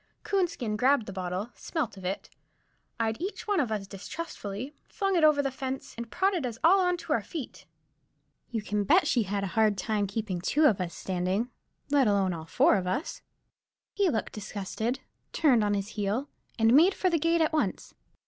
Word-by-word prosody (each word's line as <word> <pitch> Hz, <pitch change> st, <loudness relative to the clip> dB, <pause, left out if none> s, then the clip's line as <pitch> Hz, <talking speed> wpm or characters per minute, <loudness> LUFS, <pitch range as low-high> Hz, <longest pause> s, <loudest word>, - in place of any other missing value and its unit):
Coonskin 335 Hz, -, 0 dB
grabbed 255 Hz, 0 st, +3 dB
the 195 Hz, -, -7 dB
bottle, 185 Hz, +4 st, -3 dB
smelt 305 Hz, -11 st, -3 dB
of 190 Hz, -, -11 dB
it, 185 Hz, +2 st, -3 dB, 0.7 s
eyed 225 Hz, +2 st, -1 dB
each 390 Hz, +4 st, -4 dB
one 405 Hz, -3 st, +2 dB
of 250 Hz, -7 st, 0 dB
us 210 Hz, -2 st, -2 dB
distrustfully, 205 Hz, -, -6 dB, 0.2 s
flung 390 Hz, -2 st, 0 dB
it 335 Hz, -, +3 dB
over 300 Hz, -2 st, +5 dB
the 275 Hz, -, -1 dB
fence, 265 Hz, 0 st, -5 dB
and 235 Hz, 0 st, -6 dB
prodded 380 Hz, -, +1 dB
us 240 Hz, -3 st, -3 dB
all 375 Hz, +4 st, +6 dB
on 360 Hz, -1 st, +2 dB
to -, -, -2 dB
our -, -, +1 dB
feet. 310 Hz, -8 st, -8 dB, 0.8 s
You 225 Hz, -3 st, -3 dB
can 210 Hz, -1 st, -1 dB
bet 345 Hz, -, +4 dB
he 245 Hz, -, +3 dB
had 200 Hz, -1 st, -2 dB
a 190 Hz, -3 st, -4 dB
hard 215 Hz, -2 st, +3 dB
job 205 Hz, +2 st, 0 dB
to 195 Hz, -, -12 dB
keep 205 Hz, -6 st, -2 dB
two 300 Hz, -, +2 dB
of 205 Hz, -9 st, +4 dB
us 170 Hz, -2 st, -4 dB
standing, 190 Hz, +6 st, -1 dB, 0.4 s
let 280 Hz, -4 st, +4 dB
alone 195 Hz, -3 st, +2 dB
all 160 Hz, -1 st, -6 dB
four 200 Hz, -, +4 dB
of 185 Hz, -1 st, -3 dB
us. 270 Hz, -, -2 dB, 0.7 s
He 400 Hz, -3 st, +2 dB
looked 220 Hz, -7 st, -2 dB
disgusted, 215 Hz, +4 st, -3 dB, 0.3 s
turned 255 Hz, -9 st, +4 dB
on 205 Hz, 0 st, +1 dB
his 200 Hz, 0 st, -3 dB
heel, 215 Hz, +6 st, -2 dB, 0.3 s
and 225 Hz, 0 st, +4 dB
made 340 Hz, +8 st, +6 dB
for 370 Hz, -, +1 dB
the 335 Hz, -, +2 dB
gate 330 Hz, +2 st, +2 dB
at 315 Hz, 0 st, +2 dB
once. 310 Hz, -, -1 dB
230 Hz, 195 wpm, -28 LUFS, 200-310 Hz, 0.8 s, all